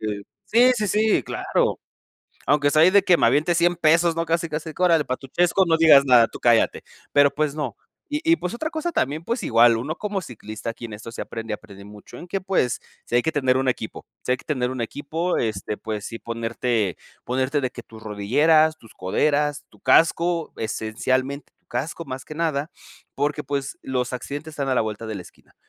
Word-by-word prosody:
Eh 105 -2 -3 0.3
Sí, 245 +4 +6
sí, 215 -2 0
sí, 215 +3 +2
claro. - - -1 0.7
Aunque 145 +1 +3
sea 155 +2 +4
ahí 180 - +7
de 200 +1 +6
que 180 -2 +4
me - - +3
aviente 150 +8 +2
100 175 +1 +2
pesos, 165 +1 +3
¿no? 165 0 -1
Casi 165 +1 0
casi 155 +1 -5
que 180 - -4
"órale 165 -4 +4
para 130 - -1
tu 135 - -12
chesco, 175 +6 +2
no 165 -1 +3
digas 150 -4 +7
nada, 125 -4 +6
tú - - -10
cállate". 120 -2 +3 0.3
Pero, 145 -1 +5
pues, 150 -1 0
no. 145 -8 -4 0.3
Y 295 +1 -1
y, - - +8
pues, 180 - -4
otra 310 +6 -3
cosa 320 +1 -2
también, 150 - -1
pues, 235 +3 -2
igual, 115 0 +5
uno 150 +8 -4
como 205 -2 -3
ciclista 110 - -7
aquí 120 - -9
en 110 - -11
esto 110 +2 -9
se - - -5
aprende, 115 -1 -5
aprende 100 -2 -12
mucho, 105 0 -12
en 175 - -9
que, 195 +2 -2
pues, 185 - 0 0.3
sí - - -6
hay 120 - +4
que 160 - 0
tener 130 -3 +2
un 130 0 0
equipo, 110 -3 -3 0.2
si 125 - 0
hay - - +1
que - - -17
tener 125 -4 -1
un 130 - -5
equipo, 155 +8 -2
este 105 -2 -2
pues 105 -2 -5
sí 115 +1 -6
ponerte 115 -3 -2 0.3
ponerte 130 +3 0
de 130 - -1
que 120 - -9
tus 110 -1 -14
rodilleras, 150 +10 +3
tus 115 -6 -18
coderas, 145 +10 0
tu - - -21
casco, 165 0 +3
esencialmente 130 +6 -2
tu - - -47
casco 150 +7 -4
más 130 -3 -7
que 155 - -9
nada 160 -2 -1 0.4
porque 150 +2 -1
pues 140 -1 -3
los 125 -1 -2
accidentes 145 +5 -6
están 140 -2 -3
a 130 - +2
la - - +4
vuelta 110 +1 -5
de 110 - -4
la 90 - -6
esquina. - - -20
140 Hz, 215 wpm, -23 LUFS, 115-165 Hz, 0.7 s, y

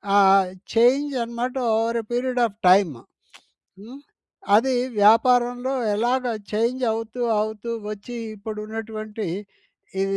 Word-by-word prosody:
ఆహ్, 195 -1 +5 0.3
చేంజ్ 260 +6 +3
అనమాట 235 +2 -4 0.2
over 230 +1 0
a - - -20
period 250 +1 -1
of 210 -3 -5
time. 185 -6 +4 0.8
హ్మ్. 240 +7 -11 0.6
అది 260 +5 +3 0.3
వ్యాపారంలో 245 +4 +4 0.2
ఎలాగ 245 +4 0 0.3
చేంజ్ 235 +4 0
అవుతూ, 225 +2 -5 0.2
అవుతూ 220 +2 -4 0.2
వచ్చి 215 +3 -7 0.2
ఇప్పుడు 215 +1 -7
ఉన్నటువంటి, 215 -1 -6 0.8
ఈ - - +3
225 Hz, 110 wpm, -23 LUFS, 210-245 Hz, 0.8 s, ఆహ్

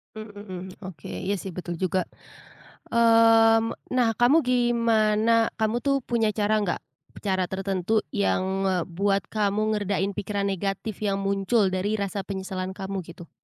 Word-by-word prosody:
Mmm, 215 0 -8
mhm, 190 -3 -7 0.3
oke 165 -7 -9
iya 195 +2 -3
sih 190 - -6
betul 175 -1 -4
juga. 185 -1 0 0.9
Mmm, 225 -1 +5 0.2
nah 250 -2 +3
kamu 245 +6 +5
gimana? 230 -3 +2 0.2
Kamu 220 0 0
tuh 275 +2 +1
punya 235 -2 +1
cara 210 0 +1
nggak? 195 -4 -1 0.4
Cara 190 -2 +1
tertentu 195 +3 -1
yang 200 -2 +1 0.2
ngebuat 190 +2 0
kamu 210 -1 0 0.2
ngeredain 200 -1 -1
pikiran 200 0 -3
negatif 195 +2 -3
yang 195 0 -1
muncul 195 +1 +1
dari 195 +3 -1
rasa 200 0 -3
penyesalan 190 -1 -4
kamu 195 0 -4
gitu. 170 0 -11
205 Hz, 140 wpm, -25 LUFS, 190-225 Hz, 0.9 s, Mmm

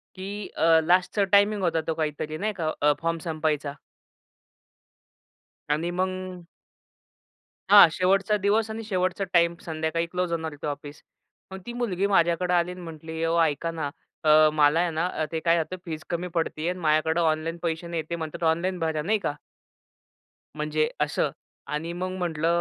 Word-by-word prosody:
की 200 +2 -6
अ, 165 0 +5
लास्टचा 180 +4 +2
टायमिंग 205 0 +4
होता 165 -2 +1
तो 160 - +1
काहीतरी 155 0 -3
नाही 215 +5 -1
का? 160 -3 -1
अ, 150 0 +5
फॉर्म 165 0 0
संपवायचा. 155 -2 -1 2.0
आणि 160 +4 0
मग 185 0 -3 1.3
हां 205 -3 +10
शेवटचा 195 +4 +2
दिवस 215 +2 +2
आणि 220 +1 -5
शेवटचा 185 -2 -1
टाईम 170 -1 +4
संध्याकाळी 160 +1 -2
क्लोज 180 -1 -1
होणार 160 -1 -2
होतं 145 - -6
ऑफिस. 145 0 -6 0.5
मग 190 - -6
ती 240 - -6
मुलगी 200 -6 -1
माझ्याकडं 180 -2 +2
आली 175 0 +2
आणि 180 0 -9
म्हटली, 160 -1 -6
ओ 165 +1 +1
ऐका 160 +1 0
ना, 160 -3 -3 0.3
अ, 155 0 +6
मला 150 +1 +4
आहे 175 -1 +1
ना 165 +3 -1 0.2
ते 165 - -1
काय 165 +1 +3
आता 165 +3 -3
फीज 160 -2 -5
कमी 175 +1 -2
पडतीये 165 0 -1
आणि 180 +1 -4
माझ्याकडं 160 +1 +2
ऑनलाईन 160 +1 0
पैसे 165 0 -2
नाहीयेत. 165 -2 -3
ते 170 - -1
म्हणतात 160 0 -6
ऑनलाईन 180 +3 -2
भरा, 160 -2 -1
नाही 210 +7 +1
का 150 - -2 1.2
म्हणजे 155 0 0
असं. 150 0 +1 0.4
आणि 155 +3 -3
मग 185 +1 -3
म्हटलं 165 -3 -1
165 Hz, 160 wpm, -26 LUFS, 155-185 Hz, 2.0 s, हां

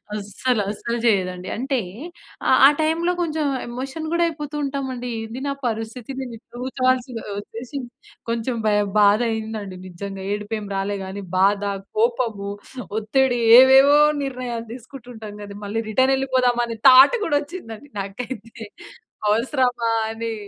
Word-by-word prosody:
అస్సలు. 210 +3 -1
అస్సలు 235 +3 -3
చేయదండి. 185 -3 0
అంటే 265 +2 -1 0.7
ఆహ్, 260 - +5
ఆ - - +8
టైమ్‌లో 330 +3 +1
కొంచెం 315 -2 -1 0.2
ఎమోషన్ 265 +6 -5
గూడా 340 0 +2
అయిపోతూ 300 -2 -6
ఉంటాం 275 0 -2
అండి. 245 0 -5
"ఏంది 225 +3 -7
నా 280 - 0
పరిస్థితి 225 +2 -5
నేను 250 -3 -6
ఇపుడు 240 +2 -12
ఉతవాల్సి 255 -1 +1 0.3
ఒచ్చేసి" 235 +7 -7 0.5
కొంచెం 235 +1 -2
భయం 205 -1 +2
బాధ 205 +1 +5
అయిందండి. 220 -4 -5
నిజంగా 195 +2 -7
ఏడుపు 210 +2 -4
ఏమి 205 -1 -8
రాలే 200 +1 -2
గానీ, 195 +1 -6
బాధ, 200 +2 +3 0.4
కోపము, 225 -3 0 0.5
ఒత్తిడి 245 +3 +1 0.2
ఏవేవో 270 +3 +7 0.2
నిర్ణయాలు 250 -3 -4
తీసుకుంటూ 250 0 -11
ఉంటాం 215 -2 -9
గదా! 200 0 -9
మళ్ళి 225 +3 -2
రిటర్న్ 260 +5 +3
ఎళ్ళిపోదామ 255 -2 +1
అనే 230 -1 -5
థాట్ 265 - +8
గూడా 290 -3 +2
ఒచ్చింది 290 -7 -8
అండి 290 - -17
నాకైతే. 225 +3 -7 0.8
అవసరమా 245 +1 +1 0.2
అని 225 0 -4
240 Hz, 140 wpm, -22 LUFS, 210-265 Hz, 0.8 s, ఆ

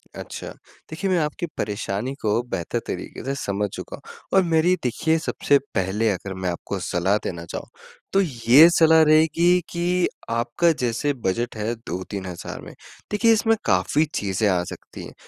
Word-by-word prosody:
अच्छा, - - -7 0.4
देखिए 180 +5 -3
मैं 180 - +3
आपकी 155 +2 -2
परेशानी 105 +4 -3
को 110 +2 +1
बेहतर 85 - -2
तरीके - - -6
से 135 +1 -2
समझ 100 +1 -1
चुका - - -7
हूँ - - -14 0.2
और 190 - +6
मेरी 165 +3 +3
देखिए, 160 +6 +1
सबसे 145 -2 +2 0.2
पहले 95 +4 +1
अगर 95 0 -3
मैं 95 -1 -3
आपको 85 - -4
सलाह 95 +4 +1
देना 85 -2 -5
चाहूँ, - - -7 0.5
तो 195 - +5
ये 135 0 +6
सलाह 160 -1 +5
रहेगी 160 +3 +4
कि 175 +1 +1 0.2
आपका 120 +9 +1
जैसे 130 0 -1
बजट 120 0 -2
है 110 +2 -1
2-3,000 95 -4 -6
में। - - -11 0.4
देखिए 225 +2 +3
इसमें 225 +1 +3
काफ़ी 95 - +2
चीजें 100 +1 0
आ 90 -2 +1
सकती - - -10
हैं। - - -11
120 Hz, 160 wpm, -23 LUFS, 100-160 Hz, 0.5 s, और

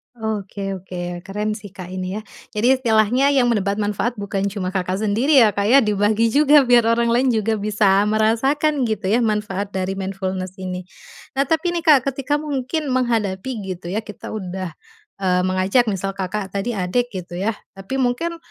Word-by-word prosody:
Oke 205 -3 -4
oke, 175 -2 -5
keren, 210 +2 -2
sih, 210 - -10
Kak, 180 -1 -8
ini, 185 +1 -4
ya. 215 - -4 0.3
Jadi 250 +5 +3
istilahnya 235 +2 +3
yang 245 -3 +3
mendapat 200 -3 0
manfaat 210 +3 -1
bukan 200 -1 -2
cuma 190 -2 -3
Kakak 190 +1 -2
sendiri, 245 +6 +4
ya, 215 - +4
Kak, 200 0 -1
ya, 265 +4 +6
dibagi 210 +2 +2
juga 290 +2 +6
biar 240 -2 +4
orang 230 0 +2
lain 245 0 +2
juga 220 0 0
bisa 205 -1 +3
merasakan 250 +6 +2
gitu, 210 -3 -1
ya, 235 - +4
manfaat 210 -3 -1
dari 190 0 -1
mindfulness 190 -1 -4
ini. 185 -1 -6 0.5
Nah, 275 - +3
tapi, 320 +4 0
nih, 340 - -2
Kak, 300 -5 +7
ketika 275 +2 -1
mungkin 290 +1 -3
menghadapi 225 -3 0 0.2
gitu, 175 0 -8
ya, 210 - 0
kita 210 -2 -9
udah, 185 -4 -5 0.5
eee, 180 -2 +2
mengajak 185 +6 +2
misal 195 -1 -1
Kakak 195 +1 -3
tadi 200 +5 -2
adik 225 +6 -1
gitu, 175 -2 -7
ya. 205 +4 +1 0.2
Tapi 195 +7 -6
mungkin, 265 +6 0
210 Hz, 175 wpm, -21 LUFS, 190-245 Hz, 0.5 s, Kak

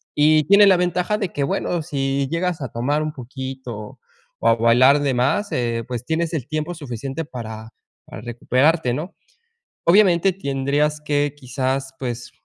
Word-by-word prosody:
y 155 +1 +4
tiene 200 +2 +7
la 190 - +6
ventaja 180 +3 0
de 195 -5 -2
que 140 - -1
bueno, 175 +4 -1
si 135 -1 -1
llegas 170 -2 -1
a 130 - -3
tomar 140 +6 -1
un 155 -1 -3
poquito 130 -4 -7 0.4
o 115 - 0
a 115 - +5
bailar 125 +5 +5
de 140 -2 +1
más, 140 +12 +1
eh, 115 -2 -1
pues, 125 -1 -5
tienes 165 0 -1
el 135 -6 -3
tiempo 155 +3 -3
suficiente 135 +1 -5
para 110 -4 -8 0.4
para 105 - -10
recuperarte, 125 +4 +1
¿no? 160 +8 -5 0.7
Obviamente 185 0 +5
tendrías 145 -1 -1
que 145 -1 0
quizás, 135 0 -3
pues, 125 -1 -5
140 Hz, 160 wpm, -21 LUFS, 125-160 Hz, 0.7 s, tiene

